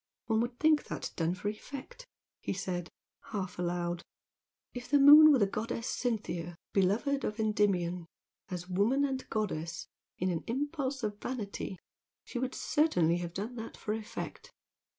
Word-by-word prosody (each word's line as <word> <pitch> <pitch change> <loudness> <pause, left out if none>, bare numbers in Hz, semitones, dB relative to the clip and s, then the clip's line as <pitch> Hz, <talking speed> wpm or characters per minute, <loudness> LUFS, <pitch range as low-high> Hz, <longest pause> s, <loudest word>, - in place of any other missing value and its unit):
"One 220 -1 +2
would 240 +1 -3
think 310 -1 +4
that - - -5
done 165 +1 0
for 185 +3 -5
effect!" 280 - -7 0.3
he - - -2
said, 180 -3 -3 0.4
half 190 -5 -4
aloud 175 -1 -1 0.7
"If 245 0 -7
the 290 - +5
moon 300 +2 +10
were 280 - +6
the 210 - +4
goddess 225 +3 -3
Cynthia 185 -8 -2 0.2
beloved 225 +9 +2
of 210 +2 -2
Endymion, 185 -5 +1 0.4
as 180 -1 -5
woman 215 +10 +2
and 265 -1 -3
goddess 170 -6 -2 0.3
in 185 +1 0
an 165 - -2
impulse 280 +1 -2
of 205 -1 -2
vanity 210 -6 -4 0.5
she 245 - -5
would 260 +1 -2
certainly 175 - +2
have 175 0 -5
done 210 +5 -3
that 225 0 -7
for 210 - -2
effect! 225 - -6
215 Hz, 150 wpm, -31 LUFS, 180-260 Hz, 0.7 s, moon